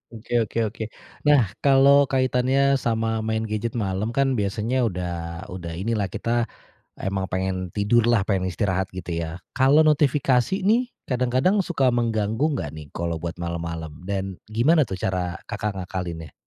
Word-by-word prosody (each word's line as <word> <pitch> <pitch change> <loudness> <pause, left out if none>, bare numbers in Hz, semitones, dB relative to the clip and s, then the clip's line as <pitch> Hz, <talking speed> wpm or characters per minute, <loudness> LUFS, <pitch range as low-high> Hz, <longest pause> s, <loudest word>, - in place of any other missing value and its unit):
Oke 120 +2 -1
oke 115 +1 -2
oke. 110 +1 -3 0.4
Nah, 130 -10 +5
kalau 140 0 +6
kaitannya 135 +1 +2
sama 115 -1 0
main 110 0 -1
gadget 110 +2 -3
malam 105 +2 -2
kan 135 -3 +2
biasanya 115 +5 0
udah 90 -3 -3 0.4
udah 85 -2 -6
inilah 105 +1 -1
kita 115 +5 -1 0.5
emang 95 0 -2
pengen 95 -1 -2
tidurlah, 110 0 +2
pengen 95 -2 0
istirahat 95 0 -1
gitu 90 -2 -5
ya. 85 +1 -4 0.2
Kalau 135 +3 +5
notifikasi 145 +3 +2
nih 245 +3 +3 0.2
kadang-kadang 130 +10 +2
suka 150 -7 +1
mengganggu 115 0 +1
nggak 80 - -2
nih 75 - -8
kalau 85 0 -2
buat 85 +1 -5
malam-malam? 85 -2 -4
Dan 95 0 -3
gimana 135 +9 +3
tuh 95 -6 -5
cara 90 -1 -2
Kakak 105 -1 -3
ngakalinnya? 85 -4 -5
110 Hz, 145 wpm, -24 LUFS, 95-130 Hz, 0.5 s, kalau